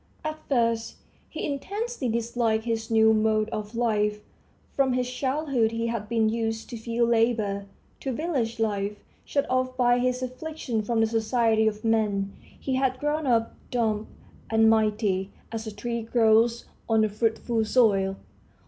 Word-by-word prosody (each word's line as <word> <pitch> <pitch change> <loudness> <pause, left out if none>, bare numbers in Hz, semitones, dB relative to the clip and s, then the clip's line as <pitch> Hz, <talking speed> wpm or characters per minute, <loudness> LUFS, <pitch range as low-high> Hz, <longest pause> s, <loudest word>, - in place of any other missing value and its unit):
At 310 0 -3
first 230 -3 +1 0.3
he 315 - -4
intensely 400 - -3
disliked 230 -1 0
his 225 -1 -2
new 220 -1 +5
mode 215 0 +2
of 215 0 -5
life. 210 -3 +1 0.5
From 270 -2 +2
his 250 0 0
childhood 260 -2 0
he 230 0 -2
had 230 -3 -3
been 225 -1 +2
used 225 +1 -2
to - - -4
field 235 +1 0
labor, 220 -4 +1 0.3
to 270 - -3
village 255 -6 -2
life. 205 -2 -1 0.3
Shut 280 - 0
off 255 0 0
by 245 -1 +4
his 250 +1 0
affliction 255 -2 -3
from 225 +1 0
the - - +5
society 225 0 +2
of 215 +1 -2
men, 205 -3 +1
he 270 - -6
had 260 -1 +1
grown 295 +1 -1
up, 230 -2 +2 0.2
dumb 220 -3 0 0.4
and 225 0 +4
mighty, 210 -3 +1 0.2
as 225 -1 -5
a - - -4
tree 235 +3 -3
grows 230 0 +3 0.2
on 220 -1 +4
a - - +1
fruitful 225 +1 0
soil. 200 -5 +3
230 Hz, 155 wpm, -26 LUFS, 220-250 Hz, 0.5 s, new